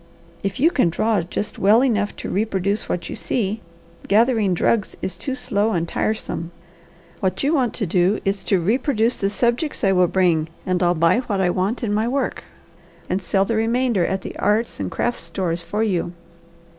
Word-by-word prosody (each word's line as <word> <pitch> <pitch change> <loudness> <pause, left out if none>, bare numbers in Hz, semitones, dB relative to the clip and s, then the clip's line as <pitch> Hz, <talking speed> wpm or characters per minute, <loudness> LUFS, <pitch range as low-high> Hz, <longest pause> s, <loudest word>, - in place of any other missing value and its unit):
If 195 +5 -3
you 320 +6 +4
can 255 - +2
draw 215 +6 +1
just 175 +5 -4
well 215 +6 +5
enough 210 -6 0
to - - -6
reproduce 200 0 -1
what 175 - -2
you - - -5
see, 220 -2 -2 0.5
gathering 220 -3 +3
drugs 205 +4 0
is 185 - -2
too 260 +9 -4
slow 220 -4 0
and 170 -2 -1
tiresome. 190 -4 -2 0.7
What 190 +2 -1
you 290 +4 +2
want 255 -7 +1
to 215 - -1
do 180 +4 +2
is 195 0 -1
to 195 - +2
reproduce 230 - +1
the 195 - 0
subjects 240 +8 -1
I 195 - +4
will 180 -1 +4
bring, 170 -4 +2 0.2
and 185 -1 0
I'll 175 0 +3
buy 165 +7 +3
what 215 -6 -2
I 180 -2 +2
want 195 +8 -1
in 210 -3 0
my 215 +2 +1
work, 265 +2 -2 0.7
and 195 - 0
sell 195 +1 +1
the 230 - -1
remainder 230 -2 +1
at 190 +2 -1
the - - -7
arts 215 +3 0
and - - -2
crafts 240 0 -1
stores 170 0 -2
for 210 +6 -2
you. 180 -5 0
205 Hz, 190 wpm, -21 LUFS, 185-230 Hz, 0.7 s, well